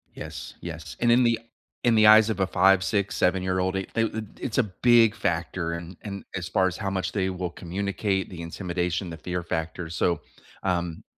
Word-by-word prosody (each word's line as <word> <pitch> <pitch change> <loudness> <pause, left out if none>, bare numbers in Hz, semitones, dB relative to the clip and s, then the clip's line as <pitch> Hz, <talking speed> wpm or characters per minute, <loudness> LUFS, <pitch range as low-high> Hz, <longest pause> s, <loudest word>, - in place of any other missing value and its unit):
Yes, - - -7
yes. 80 -2 -7
And 120 0 +3
in 125 +1 +5
the 115 -1 +2 0.4
in 120 - +4
the 110 -1 +6
eyes 110 +1 +8
of 105 - -4
a 95 - +2
five, 95 0 +4
six, 100 -1 0
seven-year-old, 95 0 +1
they 95 0 -1
they 115 - +2
it 110 0 -3
it's 125 -2 -3
a 130 - +5
big 115 +2 +4
factor 85 0 -1
in 85 +1 -7
in 100 -2 -6
as 90 -2 -3
far 95 +1 +2
as 90 - -3
how 100 -3 -2
much 95 -1 -2
they 95 -2 0
will 90 -1 -3
communicate, 95 +2 -2
the 90 -3 -8
intimidation, 90 +1 -2
the 80 - -7
fear 90 +2 -4
factor. 80 0 -3
So, 85 -1 0 0.4
um, 85 -3 -1
95 Hz, 200 wpm, -26 LUFS, 85-105 Hz, 0.4 s, eyes